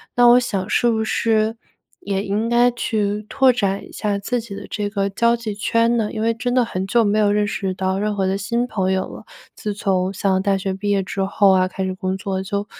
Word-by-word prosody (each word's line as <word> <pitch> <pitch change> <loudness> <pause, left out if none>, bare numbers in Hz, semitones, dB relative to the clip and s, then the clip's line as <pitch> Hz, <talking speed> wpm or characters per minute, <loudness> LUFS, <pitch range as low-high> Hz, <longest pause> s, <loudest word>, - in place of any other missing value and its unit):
那 245 - +5
我 240 +1 +7
想 200 -5 -3
是 240 - +2
不 220 -1 +1
是， 220 0 +1 0.4
也 195 0 -2
应 210 +3 -1
该 240 +1 +4
去 210 -3 -2
拓 265 +2 +4
展 200 -5 -1
一 - - -15
下 205 -2 -2
自 240 +5 -2
己 220 -3 -9
的 200 0 -8
这 205 -1 -2
个 200 -1 -1
交 235 +4 +2
际 230 -3 -5
圈 230 +3 +1
呢？ 215 -2 0
因 215 - -3
为 230 +1 +2
真 245 +2 -2
的 250 -1 +4
很 190 -4 -4
久 235 +3 +3
没 210 0 +2
有 210 -1 +3
认 210 0 +2
识 195 -2 -2
到 190 +1 -1
任 210 0 -1
何 195 -1 0
的 190 +1 0
新 235 +4 -1
朋 190 -5 -1
友 190 0 -1
了， - - -11 0.3
自 210 - -4
从 190 -2 0
上 190 0 +1
大 195 0 +1
学 190 0 -3
毕 200 +2 -4
业 200 -1 +2
之 195 +1 -4
后 195 0 +3
啊 185 -1 +3
开 190 +1 -4
始 190 0 -2
工 185 0 -3
作 190 -1 -3
就 200 +1 -3
205 Hz, 265 characters per minute, -21 LUFS, 195-230 Hz, 0.4 s, 我